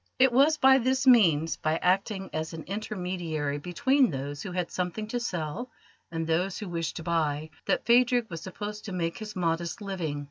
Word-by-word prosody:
It 260 0 +5
was 285 +5 +4
by 265 -1 +6
this 260 +2 +1
means, 165 - +5
by 155 +1 0
acting 190 +2 0
as 160 +1 -3
an 160 -1 -6
intermediary 180 -7 -3
between 255 - +2
those 140 +1 -5
who 190 - -6
had 180 -1 -2
something 180 +4 -3
to 245 - -1
sell 180 +2 -4 0.4
and 165 -1 -2
those 175 +4 0
who 210 - -6
wished 165 -2 -3
to 165 - -6
buy, 155 -2 -1 0.2
that - - +1
Phadrig 245 0 +4
was 165 -6 -7
supposed 205 +3 -6
to 200 - -5
make 165 -2 -2
his 215 -1 -7
modest 170 +1 -1
living. 180 -8 -3
180 Hz, 185 wpm, -28 LUFS, 165-220 Hz, 0.4 s, by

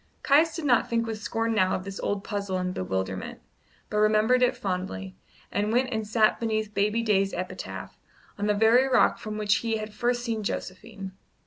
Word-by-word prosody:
Caius 315 +3 +4
did 330 -3 -4
not 245 -4 +3
think 230 0 +1
with 220 -2 -5
scorn 225 +1 -1
now 185 -3 +2
of 185 - -4
this 195 0 -7
old 200 -1 -2
puzzle 200 -3 -3
and 180 0 -2
bewilderment, 95 - -3 0.5
but 210 - +1
remembered 215 +4 +4
it 250 - +3
fondly, 180 - -4 0.4
and 205 +2 0
went 255 +2 +1
and 220 -1 -2
sat 215 0 +3
beneath 220 -2 -1
baby 210 +3 +1
Day's 195 -3 +2
epitaph, 185 - -6 0.4
on 205 0 -2
the 210 - +2
very 225 +5 +5
rock 255 - +3
from 215 -1 -5
which 205 -1 +2
he 225 -1 -1
had 215 0 -6
first 240 +2 0
seen 225 -2 -2
Josephine. 195 0 -5
215 Hz, 190 wpm, -27 LUFS, 200-230 Hz, 0.5 s, very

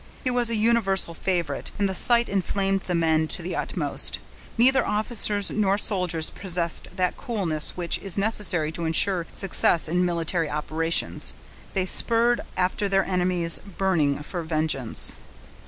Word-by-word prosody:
He 255 - -1
was 245 -1 +1
a 230 - +2
universal 210 -6 0
favorite, 170 -5 -3
and 200 - 0
the 190 - -4
sight 235 +5 +2
inflamed 195 0 -1
the 180 -2 -4
men 160 -1 +1
to 175 - -4
the 180 - -5
utmost: - - 0 0.4
neither 265 +3 +4
officers 210 -2 -1
nor 200 -2 0
soldiers 180 -6 +1
possessed 175 -3 -2
that 185 -2 -2
coolness 185 - -3
which 175 -1 0
is 195 -2 -3
necessary 195 -7 +2
to 165 +1 -5
insure 170 +2 +2
success 175 -3 +3
in 175 +3 0
military 170 -2 -2
operations; 160 +2 0 0.4
they 190 -1 0
spurred 235 +5 +2 0.2
after 185 +2 -1
their 195 -1 +1
enemies, 180 -2 +3 0.2
burning 155 -7 0
for 175 +3 -6
vengeance. 155 -6 +1
185 Hz, 145 wpm, -23 LUFS, 165-205 Hz, 0.4 s, neither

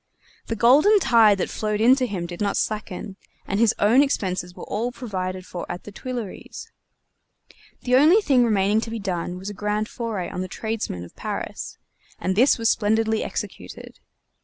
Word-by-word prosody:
The 230 - -2
golden 290 - +5
tide 225 - +5
that 185 - -2
flowed 210 -1 -2
in 240 +4 +6
to 255 -2 0
him 190 -5 -4
did 175 +2 -8
not 200 -1 0
slacken, 205 -2 -3 0.3
and 200 - -2
his 230 -2 +3
own 225 +6 +5
expenses 185 -10 -1
were - - -9
all 230 +4 -2
provided 185 -6 -5
for 175 -1 -6
at 175 - -7
the 210 - -10
Tuileries. 240 -2 -7 1.1
The 250 0 +2
only 320 +9 +6
thing 270 - +3
remaining 210 -1 +2
to 230 - -5
be 230 - -4
done 180 -3 -3
was 190 +3 -6
a - - -8
grand 210 +1 -2
foray 220 -8 -4
on 180 - -5
the 185 - -3
tradesmen 220 - -4
of 90 - -13
Paris, - - -5 0.4
and 185 - -1
this 250 +7 +4
was 230 -1 0
splendidly 220 0 +1
executed. - - -7
215 Hz, 180 wpm, -23 LUFS, 190-235 Hz, 1.1 s, in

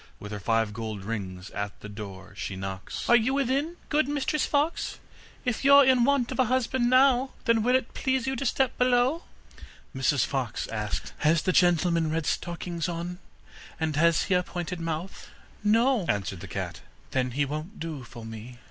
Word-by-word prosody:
With 105 - -8
her 105 - -4
five 115 +1 +1
gold 110 -2 -5
rings 95 -4 -5
at 100 0 -5
the - - -7
door 100 -2 -9
she 100 - -4
knocks: 95 0 -5
'Are 240 - +7
you 240 +3 +3
within, 280 +5 0
good 305 -1 +2
Mistress 290 +1 0
Fox? 295 +3 0 0.5
If 245 0 -1
you're 280 0 +8
in 255 -2 +5
want 275 -3 +2
of 260 - -5
a 255 - +5
husband 250 0 +1
now, 260 0 +4
Then 230 -1 +3
will 250 +3 +3
it 260 -2 0
please 265 -1 0
you 265 0 -1
to 265 - -2
step 265 +1 +1
below? 250 +6 +2 0.7
Mrs 135 -1 +2
Fox 130 -6 -2
asked: 105 -2 -3
'Has 155 +1 +3
the 185 - +2
gentleman 170 -2 +3
red 160 0 -1
stockings 170 -1 -2
on, 175 +1 -4 0.6
and 160 -2 -1
has 170 +2 +4
he - - 0
a 180 - +4
pointed 175 0 -5
mouth?' 165 +2 -4 0.4
'No,' 225 -1 +3
answered 100 -2 -1
the 95 - -8
cat. 80 - -5 0.3
'Then 130 -1 0
he 145 - +3
won't 155 +8 -6
do 155 -5 -5
for 120 -1 -10
me. 115 +2 -9
170 Hz, 185 wpm, -27 LUFS, -, 0.7 s, you're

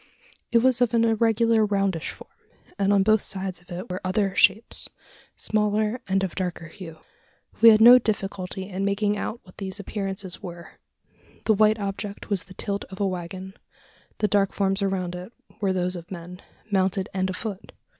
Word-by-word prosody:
It 235 0 +4
was 255 -1 +3
of 240 -1 +3
an 230 0 +4
irregular 225 0 +3
roundish 195 -5 0
form; - - -11 0.5
and 200 0 +3
on 200 -1 +4
both 215 +1 +4
sides 190 -1 -5
of 175 - -26
it 180 +2 -6
were 180 - -4
other, 195 +1 0
shapes 205 +3 +2 0.5
smaller 215 +2 0
and 195 0 +1
of 185 - -2
darker 175 -3 -4
hue. 165 -3 -10 0.6
We 230 - +10
had 215 0 +6
no 245 +2 +10
difficulty 195 -4 -3
in 195 0 -4
making 205 +1 +1
out 225 +3 -4
what 180 - -18
these 195 0 -5
appearances 195 -2 -5
were: 175 -1 -10 0.7
the 220 - +5
white 215 +1 +4
object 200 +1 -5
was 195 -3 +1
the 185 - -14
tilt 200 +1 -3
of 190 - -11
a 200 - +2
waggon: 185 +1 -5 0.6
the 210 - +1
dark 200 -1 +2
forms 195 0 0
around 190 -3 -1
it 180 +4 -7 0.3
were 195 -2 +2
those 180 0 0
of 170 -1 -9
men 180 0 -8 0.3
mounted 190 0 +1
and 190 0 0
afoot! 195 +1 -5
195 Hz, 175 wpm, -25 LUFS, 185-210 Hz, 0.7 s, We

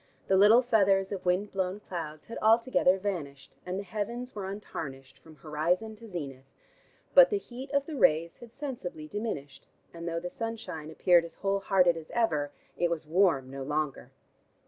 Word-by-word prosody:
The 190 - +5
little 210 +6 +7
feathers 195 -5 +3
of 185 -2 -5
wind 185 +4 +1
blown 190 +1 -2
clouds 160 -6 -6
had 230 - -7
altogether 225 -4 +4
vanished, 155 -9 -5
and 180 +1 -2
the 200 - -3
heavens 235 +5 -4
were 200 -3 -5
untarnished 135 -9 -7
from 160 -1 -16
horizon 165 +9 -1
to 230 - -12
zenith. 140 -8 -7 0.7
But - - +9
the 415 - +1
heat 260 -7 -8
of 280 0 +1
the 315 - -6
rays 165 - +3
had 235 -2 -13
sensibly 235 - -6
diminished, 180 -8 -5 0.3
and 170 0 -7
though 165 0 -1
the 180 +1 -6
sunshine 195 -9 -5
appeared 175 +1 +4
as 165 -1 -10
whole 195 0 0
hearted 185 -3 +3
as 160 -1 -9
ever, 155 -12 +1 0.3
it 175 - +2
was 165 -2 -3
warm 155 -6 +2
no 135 0 -6
longer. 150 +1 -2
185 Hz, 175 wpm, -29 LUFS, 155-220 Hz, 0.7 s, But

